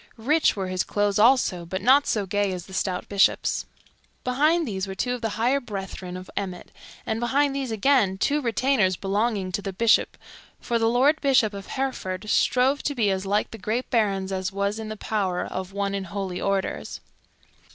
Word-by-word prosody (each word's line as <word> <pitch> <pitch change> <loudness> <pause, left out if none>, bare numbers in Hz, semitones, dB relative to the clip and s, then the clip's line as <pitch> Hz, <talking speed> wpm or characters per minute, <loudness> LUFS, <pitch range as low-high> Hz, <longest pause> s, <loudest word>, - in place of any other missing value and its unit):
Rich 300 +8 +2
were 195 -2 -3
his 185 -1 -1
clothes 205 -1 0
also, 220 -6 +4
but 185 +3 -4
not 265 +8 +4
so 210 -3 0
gay 205 +1 0
as 180 -1 -6
the 190 - -13
stout 185 -1 -2
Bishop's. 200 -1 +2 0.6
Behind 300 +6 +2
these 195 -2 -3
were 190 - -6
two 245 +6 -1
of 250 - -5
the 225 - -1
higher 250 +5 +2
brethren 195 -6 -6
of 185 0 -9
Emmet, 185 -3 -5 0.3
and 220 0 -2
behind 275 +4 +1
these 270 -2 -2
again 220 -3 +2
two 290 +9 +1
retainers 235 -5 +2
belonging 200 0 -1
to 200 - -2
the 195 - -4
Bishop; 220 +4 +2 0.4
for 235 -1 -1
the 225 0 +3
Lord 275 +6 +3
Bishop 255 -7 +3
of 200 -1 -8
Hereford 215 -8 -3
strove 265 +3 +3
to 285 - -2
be 215 -5 +2
as 190 0 -2
like 205 +2 0
the 225 - -9
great 225 +6 -2
barons 195 -5 +1
as 190 0 -2
was 200 +2 -1
in 220 -1 -6
the 215 - -6
power 195 -4 -1
of 185 0 -5
one 200 0 -2
in 195 -1 -3
holy 190 -1 -4
orders. 195 -1 -2
205 Hz, 195 wpm, -25 LUFS, 190-250 Hz, 0.6 s, also